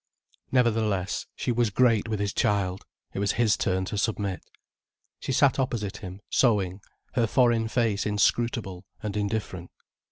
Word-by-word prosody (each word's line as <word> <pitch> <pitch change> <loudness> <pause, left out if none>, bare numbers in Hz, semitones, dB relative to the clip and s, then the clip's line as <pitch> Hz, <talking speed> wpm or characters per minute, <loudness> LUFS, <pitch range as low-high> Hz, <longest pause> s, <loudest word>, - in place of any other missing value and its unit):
Nevertheless 110 -6 +1
she - - -1
was 120 -1 +2
great 115 0 +3
with 110 -2 -1
his 100 0 -1
child, 95 -2 0 0.3
it - - -3
was 100 0 +1
his 110 -2 +3
turn 95 0 0
to 100 +2 -3
submit. 100 -3 -1 0.8
She - - -4
sat 135 +1 +3
opposite 115 -6 -2
him, 95 +2 -9
sewing, 100 -6 +2 0.3
her 115 - +2
foreign 120 -2 +3
face 110 -3 0
inscrutable 105 -2 0 0.2
and 105 -1 -3
indifferent. 100 -4 -3
105 Hz, 140 wpm, -27 LUFS, 100-115 Hz, 0.8 s, great